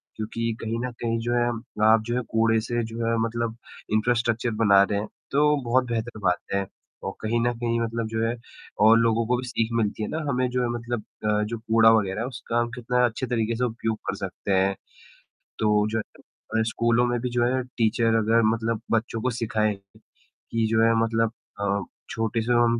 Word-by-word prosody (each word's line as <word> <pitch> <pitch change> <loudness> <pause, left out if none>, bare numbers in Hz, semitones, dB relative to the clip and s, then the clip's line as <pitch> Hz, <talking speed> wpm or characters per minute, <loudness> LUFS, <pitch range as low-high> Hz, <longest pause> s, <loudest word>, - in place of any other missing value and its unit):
क्योंकि 115 +1 -2
कहीं 115 +1 -2
न 125 - -4
कहीं 115 -1 0
जो 120 +1 -1
है 120 0 +3 0.4
आप 110 0 +6
जो 120 +1 -1
है, 125 - +1
कूड़े 115 0 +3
से 120 +1 -2
जो 115 +1 -4
है 115 0 +1
मतलब 115 0 -3 0.4
इंफ्रास्ट्रक्चर 120 +1 +1
बना 100 -2 +6
रहे 100 0 0
हैं, 105 - -4 0.2
तो 150 +1 +4
बहुत 130 +2 +3
बेहतर 115 -1 -3
बात 90 -1 +3 0.2
है 100 0 0 0.4
और 95 - -3
कहीं 115 +2 0
न 120 +1 +1
कहीं 115 -1 0
मतलब 115 0 -2
जो 110 0 -1
है 115 - -1 0.5
और 115 +1 +8
लोगों 115 0 +2
को 125 +1 +2
भी 125 +1 -5
सीख 115 -3 -1
मिलती 110 -1 0
है - - -3
ना, 160 - -2
हमें 125 -1 +1
जो 125 0 0
है 120 - 0
मतलब 120 -1 -3 0.2
अ, 105 0 +2
जो 115 +2 -3
कूड़ा 115 0 +5
वग़ैरह 105 -2 +1
है 120 - -2
उसका 120 -2 -3
हम 120 0 0
कितना 125 0 +1
अच्छे 120 +2 -2
तरीके 115 -1 0
से 125 - -1
उपयोग 115 -2 -2
कर - - -1
सकते 100 0 -3
हैं। 95 +1 +2 0.8
तो 105 -1 +3
जो 110 - 0
है, 110 +1 -5
स्कूलों 115 +2 +2
में 120 0 0
भी 125 - -2
जो 120 0 +1
है 130 +1 +1
टीचर 115 0 +2
अगर 115 +1 +3
मतलब 115 0 -2
बच्चों 115 0 0
को 130 - +1
सिखाएँ 110 -2 0 0.4
कि 115 -1 -4
जो 110 0 +3
है 115 0 +5
मतलब 115 0 +1 0.3
अ, 100 0 +1 0.3
छोटे 115 0 -1
से 120 +2 +1
हम 120 -1 +3
115 Hz, 210 wpm, -25 LUFS, 110-120 Hz, 0.8 s, और